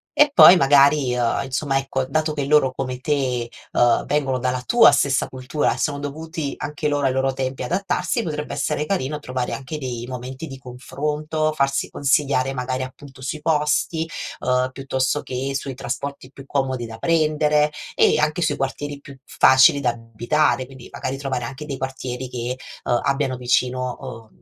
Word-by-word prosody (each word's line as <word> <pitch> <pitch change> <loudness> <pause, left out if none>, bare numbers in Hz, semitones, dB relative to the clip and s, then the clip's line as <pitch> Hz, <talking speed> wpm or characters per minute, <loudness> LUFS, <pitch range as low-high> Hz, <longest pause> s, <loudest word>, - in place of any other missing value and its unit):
e 295 0 +6
poi, 180 -8 +9
magari, 140 -2 +4
uhm, 120 -1 +1
insomma, 135 +1 -1
ecco, 135 -1 -2
dato 155 +2 0
che 145 -2 -2
loro 140 -3 +3
come 130 -2 -4
te, 130 -4 -1 0.2
uhm, 120 -1 +3
vengono 135 -3 0
dalla 125 0 -1
tua 235 -7 +7
stessa 140 -1 +1
cultura 130 +3 -1
e - - -8
sono 145 -2 -1
dovuti 155 +1 -5
anche 150 0 -3
loro 145 -1 0
ai 130 - +1
loro 135 0 +1
tempi 130 0 -3
adattarsi, 180 +3 -1
potrebbe 150 -2 -4
essere 145 +1 -1
carino 150 -6 -2
trovare 125 -3 -3
anche 135 +3 -5
dei 125 -4 -5
momenti 130 +4 -6
di 135 - -8
confronto, 150 +5 -3
farsi 140 -2 0
consigliare 135 -1 +1
magari, 130 0 -2
appunto, 130 0 -11
sui 145 +4 -4
posti, 155 +1 +1 0.3
uhm, 125 0 +1
piuttosto 135 +1 -1
che 135 +2 -4
sui 135 -1 -4
trasporti 135 +1 -5
più 135 -1 -12
comodi 130 -3 -1
da 115 0 -9
prendere 150 -2 +2 0.2
e - - +4
anche 155 +3 +1
sui 155 -4 +1
quartieri 145 +1 -3
più 140 -1 -13
facili 130 +2 +5
da 125 -3 +1
abitare, 120 +5 0
quindi 130 -1 -13
magari, 130 - -4
trovare 130 -3 -3
anche 135 +5 -7
dei 140 -3 -5
quartieri 130 -1 -5
che, 125 +1 -4 0.3
ehm, 120 - +1
abbiano 135 -2 0
vicino, 125 0 0 0.3
ehm, - - -29
135 Hz, 170 wpm, -22 LUFS, 130-150 Hz, 0.3 s, poi